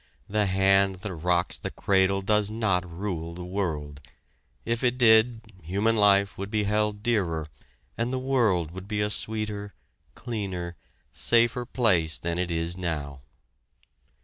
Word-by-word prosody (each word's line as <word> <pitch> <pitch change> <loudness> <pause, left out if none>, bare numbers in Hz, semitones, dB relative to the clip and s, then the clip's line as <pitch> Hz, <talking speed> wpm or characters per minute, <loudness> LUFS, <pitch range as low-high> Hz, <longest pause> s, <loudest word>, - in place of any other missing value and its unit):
The 105 0 +1
hand 95 0 +3
that 95 +1 -6
rocks 90 +2 0
the - - -4
cradle 95 0 +1
does 105 0 +2
not 100 -5 0
rule 85 -2 -4
the 90 0 -7
world. 80 -7 -3 0.6
If 115 +2 -1
it 125 0 +2
did, 115 -1 +5 0.2
human 100 +8 0
life 100 -2 +3
would 100 0 -4
be 105 -1 0
held 105 0 0
dearer 85 -10 0 0.5
and 120 +2 0
the 130 - -1
world 115 - +1
would 95 +2 -9
be 105 -1 -2
a 105 0 0
sweeter, 105 -1 -3 0.4
cleaner, 95 -7 -5 0.4
safer 120 +1 +3
place 95 -11 +1
than 85 0 -3
it 90 -1 -1
is 85 +1 -2
now! 75 -6 -4
100 Hz, 145 wpm, -26 LUFS, 90-110 Hz, 0.6 s, did